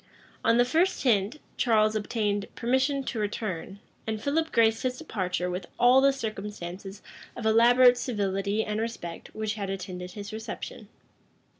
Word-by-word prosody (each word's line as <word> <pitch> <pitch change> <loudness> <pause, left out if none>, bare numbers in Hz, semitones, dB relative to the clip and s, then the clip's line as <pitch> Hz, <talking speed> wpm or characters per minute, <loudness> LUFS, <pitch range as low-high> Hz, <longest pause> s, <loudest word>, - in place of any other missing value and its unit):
On 230 +1 +4
the 245 - +5
first 330 +9 +1
hint, 225 +2 +2 0.2
Charles 215 -3 +3
obtained 205 -1 -1
permission 260 +3 +1
to 245 -3 -4
return; 200 -3 -3 0.3
and 220 -1 -2
Philip 315 +6 0
graced 225 -1 +3
his 255 -1 -1
departure 185 - -2
with 180 +1 -4
all 250 +2 +6
the 275 0 +5
circumstances 200 -5 -6 0.3
of 230 - -6
elaborate 245 +3 +6
civility 200 -2 -1
and 210 +1 -2
respect 200 -7 -6
which 215 -1 -2
had 200 -2 -4
attended 180 -1 -5
his 205 0 -7
reception. 220 -1 -7
220 Hz, 145 wpm, -27 LUFS, 200-245 Hz, 0.3 s, all